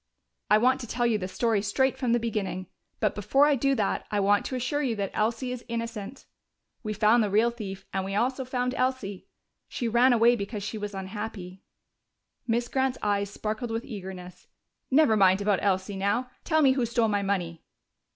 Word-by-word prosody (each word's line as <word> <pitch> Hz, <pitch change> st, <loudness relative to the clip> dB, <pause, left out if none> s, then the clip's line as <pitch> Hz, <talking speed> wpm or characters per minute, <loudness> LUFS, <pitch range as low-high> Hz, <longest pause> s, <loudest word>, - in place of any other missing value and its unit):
"I 210 Hz, -, +6 dB
want 255 Hz, +4 st, +3 dB
to 240 Hz, -, -7 dB
tell 240 Hz, +2 st, -1 dB
you 225 Hz, -3 st, +2 dB
the 185 Hz, -, -3 dB
story 215 Hz, +2 st, 0 dB
straight 255 Hz, +6 st, +1 dB
from 250 Hz, -3 st, -1 dB
the 240 Hz, -, +3 dB
beginning. 205 Hz, -5 st, -3 dB, 0.3 s
But 210 Hz, -3 st, +1 dB
before 270 Hz, +8 st, +3 dB
I 295 Hz, -, +4 dB
do 275 Hz, +1 st, +1 dB
that, 210 Hz, -5 st, -1 dB
I 205 Hz, -, 0 dB
want 205 Hz, +1 st, +2 dB
to 260 Hz, -, -4 dB
assure 255 Hz, +4 st, -1 dB
you 250 Hz, -6 st, 0 dB
that 200 Hz, -2 st, -3 dB
Elsie 230 Hz, +4 st, -1 dB
is 250 Hz, -1 st, -6 dB
innocent. 230 Hz, 0 st, -5 dB, 0.6 s
We 215 Hz, -, -4 dB
found 215 Hz, +3 st, +4 dB
the 210 Hz, -, +1 dB
real 220 Hz, +4 st, +3 dB
thief, 200 Hz, -5 st, -7 dB
and 190 Hz, -, -1 dB
we 195 Hz, +1 st, -4 dB
also 255 Hz, +5 st, 0 dB
found 250 Hz, 0 st, -2 dB
Elsie. 255 Hz, -8 st, -2 dB, 0.4 s
She 240 Hz, -, -3 dB
ran 240 Hz, +3 st, +4 dB
away 240 Hz, 0 st, +5 dB
because 205 Hz, -1 st, -5 dB
she 215 Hz, +1 st, -4 dB
was 205 Hz, -1 st, -5 dB
unhappy." 190 Hz, -1 st, -6 dB, 0.9 s
Miss 235 Hz, +1 st, 0 dB
Grant's 265 Hz, 0 st, 0 dB
eyes 200 Hz, -1 st, 0 dB
sparkled 220 Hz, +4 st, -4 dB
with 225 Hz, +1 st, -3 dB
eagerness. 185 Hz, -5 st, -9 dB, 0.4 s
"Never 275 Hz, -5 st, +4 dB
mind 190 Hz, -2 st, +5 dB
about 200 Hz, -1 st, +1 dB
Elsie 195 Hz, 0 st, 0 dB
now. 205 Hz, +6 st, 0 dB
Tell 315 Hz, -1 st, +2 dB
me 270 Hz, -, +6 dB
who 260 Hz, -1 st, +1 dB
stole 235 Hz, -1 st, +1 dB
my 205 Hz, -1 st, 0 dB
money." 180 Hz, -4 st, -2 dB
220 Hz, 195 wpm, -27 LUFS, 200-245 Hz, 0.9 s, I